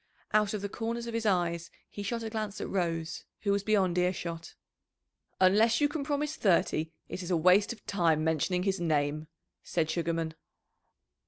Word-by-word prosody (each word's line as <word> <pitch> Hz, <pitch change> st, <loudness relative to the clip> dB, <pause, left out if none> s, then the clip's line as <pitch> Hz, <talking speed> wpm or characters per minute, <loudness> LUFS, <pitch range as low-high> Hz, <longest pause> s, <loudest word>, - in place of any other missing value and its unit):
Out 210 Hz, 0 st, +3 dB
of 205 Hz, -, -5 dB
the -, -, 0 dB
corners 230 Hz, +3 st, -3 dB
of 235 Hz, -, -5 dB
his 230 Hz, -1 st, -1 dB
eyes 170 Hz, -3 st, 0 dB, 0.2 s
he 205 Hz, -, -8 dB
shot 230 Hz, +3 st, -2 dB
a 220 Hz, -, -3 dB
glance 215 Hz, -2 st, -3 dB
at -, -, -3 dB
Rose, 165 Hz, -4 st, -2 dB, 0.2 s
who 200 Hz, -, +1 dB
was 200 Hz, 0 st, +2 dB
beyond 195 Hz, -4 st, +2 dB
earshot. 170 Hz, -2 st, -2 dB, 0.8 s
"Unless 215 Hz, +5 st, +5 dB
you 295 Hz, -, +4 dB
can 295 Hz, 0 st, -3 dB
promise 295 Hz, +1 st, -1 dB
thirty 165 Hz, -4 st, +2 dB, 0.2 s
it 185 Hz, -, -5 dB
is 180 Hz, 0 st, -5 dB
waste 180 Hz, +5 st, +4 dB
of 235 Hz, -, -10 dB
time 165 Hz, -5 st, +2 dB
mentioning 160 Hz, +3 st, +1 dB
his 195 Hz, 0 st, 0 dB
name," 155 Hz, -2 st, 0 dB, 0.3 s
said 160 Hz, -2 st, -1 dB
Sugarman. 165 Hz, -1 st, -1 dB
185 Hz, 170 wpm, -30 LUFS, 170-215 Hz, 0.8 s, Unless